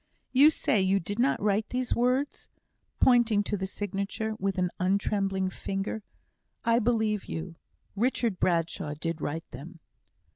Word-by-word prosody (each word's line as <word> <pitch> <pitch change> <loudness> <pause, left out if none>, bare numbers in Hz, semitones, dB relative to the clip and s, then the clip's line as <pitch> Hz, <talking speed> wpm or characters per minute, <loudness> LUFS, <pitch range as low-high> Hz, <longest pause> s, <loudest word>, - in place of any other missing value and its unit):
"You 280 +4 +7
say 220 -9 +1
you 190 +1 +3
did 205 +6 -5
not 260 +3 +2
write 210 +1 +1
these 250 0 -1
words?" 255 +4 0 0.5
pointing 235 -5 +4
to 205 - -2
the 190 -1 -3
signature, 205 +2 -3
with 195 0 -1
an 180 -1 +1
untrembling 195 0 0
finger. 195 +4 -4 0.6
"I 230 0 +4
believe 220 -3 +1
you; 165 +1 -6 0.4
Richard 230 -2 0
Bradshaw 165 -4 0
did 165 +1 -4
write 160 +3 -3
them." 155 +7 -10
200 Hz, 140 wpm, -28 LUFS, 185-230 Hz, 0.6 s, You